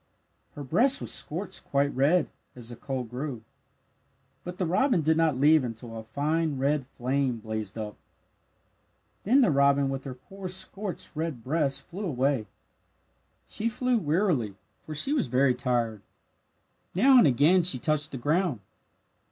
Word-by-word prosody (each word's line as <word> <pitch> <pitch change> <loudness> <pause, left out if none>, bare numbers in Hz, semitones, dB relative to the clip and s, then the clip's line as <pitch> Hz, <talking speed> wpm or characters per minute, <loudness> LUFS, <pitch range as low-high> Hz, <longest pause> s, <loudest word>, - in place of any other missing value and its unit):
Her 145 - -6
breast 255 - +3
was - - -3
scorched 175 +6 -2
quite 140 0 0
red, 150 +6 +3 0.3
as 120 -2 -8
the 120 - -7
coal 130 +1 -4
grew. 125 0 -6 1.0
But 180 0 -7
the 185 - 0
robin 185 - +2
did 160 +2 +3
not 160 -4 +2
leave 150 +1 +5
until 115 -1 -7
a 110 - -6
fine 150 +5 -1
red 140 0 0
flame 130 -1 -1
blazed 110 -2 -5
up. 105 -2 -6 1.3
Then 255 +7 +5
the 215 - +4
robin 140 0 +3
with 135 0 -5
her 130 -2 -6
poor 190 +9 -9
scorched 190 +1 -5
red 155 -7 -4
breast 140 0 -1
flew 190 +4 -7
away. 135 - 0 1.0
She 225 +2 -2
flew 250 +1 0
wearily, 150 - 0 0.3
for 155 - -5
she 270 - +1
was 285 -6 +1
very 130 0 +3
tired. 120 -4 -1 0.9
Now 260 +7 +6
and 175 - +6
again 150 +8 +4
she 170 -6 +2
touched 150 +2 0
the 135 - -5
ground. 150 - 0
145 Hz, 150 wpm, -27 LUFS, 125-180 Hz, 1.3 s, Now